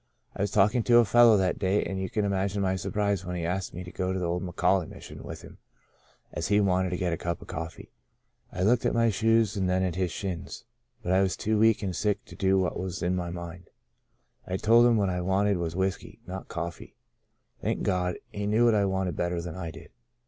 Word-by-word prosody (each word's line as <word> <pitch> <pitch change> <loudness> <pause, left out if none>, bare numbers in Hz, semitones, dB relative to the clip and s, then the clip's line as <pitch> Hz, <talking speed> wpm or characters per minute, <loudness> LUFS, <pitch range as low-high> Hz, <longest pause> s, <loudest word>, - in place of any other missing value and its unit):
I - - -4
was 100 - +1
talking 105 +5 +3
to 120 -1 +6
a 120 - +6
fellow 115 0 +6
that 95 -2 0
day 100 +1 +1
and 95 -1 -4
you 95 - -3
can 105 +2 -1
imagine 100 0 -1
my 95 0 +1
surprise 100 0 -1
when 90 -1 -4
he 85 -1 -3
asked 90 +2 -2
me 90 - -7
to 90 - -9
go 95 -1 -2
to 95 - -1
the 90 - -2
old 85 +1 -1
McAuley 90 -1 +1
Mission - - -10
with - - -8
him, - - -13 0.7
as - - -3
he 105 +1 +3
wanted 95 -2 +2
to 90 - -2
get 90 -2 -1
a - - -2
cup 85 -1 -3
of - - -13
coffee. 80 +1 -7 0.6
I 90 - -2
looked 115 +4 +3
at - - +1
my 115 -1 +3
shoes 115 0 +2
and 95 -2 0
then 95 +1 +1
at 90 -2 0
his 90 0 -1
shins, 95 0 -5 0.4
but 90 - -1
I 95 +1 +4
was 95 -1 0
too 110 0 0
weak 110 -1 +4
and 95 -3 -2
sick 105 +3 -1
to - - -12
do 95 0 +2
what 95 -1 0
was 90 -2 -4
in 90 +1 +1
my 90 -1 -3
mind. 85 0 -8 0.8
I 95 - -1
told 115 +4 +5
him 120 -2 +4
what 100 -2 +1
I 90 0 -2
wanted 95 +2 +1
was 85 -1 -3
whiskey, 95 0 -2
not 95 +2 -7
cofiee. 85 0 -6 0.7
Thank - - -1
God, 90 -1 0 0.2
he 100 0 -3
knew 110 +3 +3
what 115 - +5
I 105 -2 +3
wanted 95 -3 -1
better 85 0 -1
than 85 -1 -5
I 90 -3 -5
did. 80 0 -12
95 Hz, 240 wpm, -27 LUFS, 90-105 Hz, 0.8 s, to